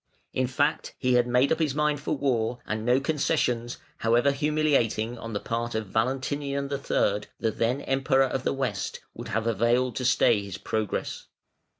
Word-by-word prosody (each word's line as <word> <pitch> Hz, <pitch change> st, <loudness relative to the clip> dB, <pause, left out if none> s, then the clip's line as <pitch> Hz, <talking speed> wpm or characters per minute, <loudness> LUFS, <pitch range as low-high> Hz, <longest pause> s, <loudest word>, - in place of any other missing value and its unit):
In 130 Hz, -1 st, +1 dB
fact 145 Hz, +4 st, 0 dB
he 125 Hz, -1 st, +1 dB
had 120 Hz, 0 st, +4 dB
made 125 Hz, +3 st, +3 dB
up 160 Hz, -, +2 dB
his 150 Hz, -4 st, 0 dB
mind 150 Hz, -1 st, +1 dB
for 145 Hz, +1 st, -2 dB
war, 120 Hz, -4 st, 0 dB
and 110 Hz, 0 st, -3 dB
no 125 Hz, +3 st, +3 dB
concessions, 135 Hz, -5 st, 0 dB, 0.2 s
however 120 Hz, +5 st, +3 dB
humiliating, 140 Hz, -6 st, +1 dB
on 115 Hz, -1 st, -6 dB
the 100 Hz, -, -1 dB
part 115 Hz, +1 st, -3 dB
of 110 Hz, 0 st, -1 dB
Valentinian 140 Hz, +5 st, -1 dB
III., 105 Hz, -7 st, 0 dB
the 115 Hz, -, +1 dB
then 120 Hz, +5 st, 0 dB
Emperor 135 Hz, 0 st, +2 dB
of 135 Hz, 0 st, -1 dB
the -, -, +1 dB
West, 130 Hz, -7 st, -3 dB
would -, -, -8 dB
have 115 Hz, +2 st, -1 dB
availed 120 Hz, +2 st, +2 dB
to 130 Hz, -, -2 dB
stay 120 Hz, -4 st, +4 dB
his 100 Hz, -1 st, -7 dB
progress. 110 Hz, +1 st, -3 dB
125 Hz, 175 wpm, -27 LUFS, 115-140 Hz, 0.2 s, had